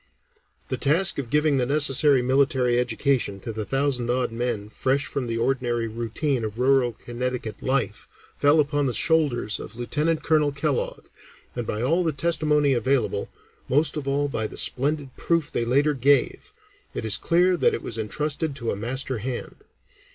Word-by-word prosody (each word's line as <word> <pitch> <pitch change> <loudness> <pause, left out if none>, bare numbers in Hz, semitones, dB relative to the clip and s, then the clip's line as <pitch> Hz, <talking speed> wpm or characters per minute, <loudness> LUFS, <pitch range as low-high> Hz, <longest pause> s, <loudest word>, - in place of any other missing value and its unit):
The - - -2
task 165 +3 +3
of 130 -4 -5
giving 150 +1 +2
the 125 - +1
necessary 140 -2 +4
military 130 -2 +2
education 125 -3 0
to 115 - -5
the 110 -1 -4
thousand 135 -2 -1
odd 125 -1 0
men 115 -3 -3
fresh 130 +5 0
from 130 -3 -3
the 115 0 -2
ordinary 120 -1 0
routine 120 +4 -2
of 110 0 -5
rural 130 -1 +2
Connecticut 120 -1 -5
life, 130 -5 -2 0.3
fell 145 +2 +4
upon 145 -1 +1
the 125 - -1
shoulders 145 -8 +1
of 110 - -9
Lieutenant 150 +7 -1
Colonel 150 -2 +2
Kellogg, 140 -1 -2 0.5
and 120 -2 -4
by 110 +2 -2
all 165 +8 +2
the 165 - +1
testimony 150 -1 +2
available, 120 -4 0 0.4
most 150 +5 +2
of 145 -3 -5
all 140 +1 +1
by 110 -6 -2
the - - -11
splendid 140 0 -1
proof 165 -3 0
they 120 - -1
later 140 +5 +2
gave, 135 0 +1 0.4
it - - -3
is 110 0 +1
clear 180 +2 +3
that - - +2
it - - -7
was 115 -1 -4
entrusted 150 +7 -2
to 120 -4 -3
a - - -2
master 125 +3 -2
hand. 125 +3 -5
130 Hz, 170 wpm, -24 LUFS, 120-145 Hz, 0.5 s, necessary